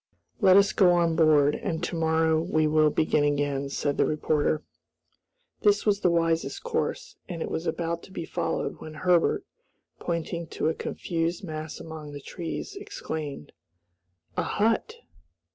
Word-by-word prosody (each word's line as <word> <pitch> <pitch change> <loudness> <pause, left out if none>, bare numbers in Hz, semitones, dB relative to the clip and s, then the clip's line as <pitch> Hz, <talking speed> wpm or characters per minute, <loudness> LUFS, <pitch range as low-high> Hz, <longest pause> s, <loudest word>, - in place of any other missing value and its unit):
"Let 190 -4 +7
us 200 +1 +4
go 180 -4 +5
on 170 -2 +2
board, 150 -3 +5
and 170 -1 -3
to 175 - -2
morrow 160 -1 +2
we 155 -2 +1
will 155 0 +4
begin 150 0 +2
again," 145 -1 0
said 145 +1 -1
the - - +4
reporter. 150 0 0 1.0
This 205 -1 +3
was 205 -2 +3
the 180 - +3
wisest 165 -1 0
course, 475 -1 -2
and 170 -2 -4
it - - -5
was 165 - -3
about 170 +1 -2
to - - -17
be 170 -3 -5
followed 160 - -2
when 155 0 -8
Herbert, 175 +2 +2 0.5
pointing 170 0 -3
to 155 - -1
a - - 0
confused 170 +3 -3
mass 155 -2 -6
among 155 -2 -8
the 145 - -6
trees, 165 - -6
exclaimed, 160 - -6 0.8
"A - - +1
hut!" 225 - 0
165 Hz, 155 wpm, -27 LUFS, 155-175 Hz, 1.0 s, Let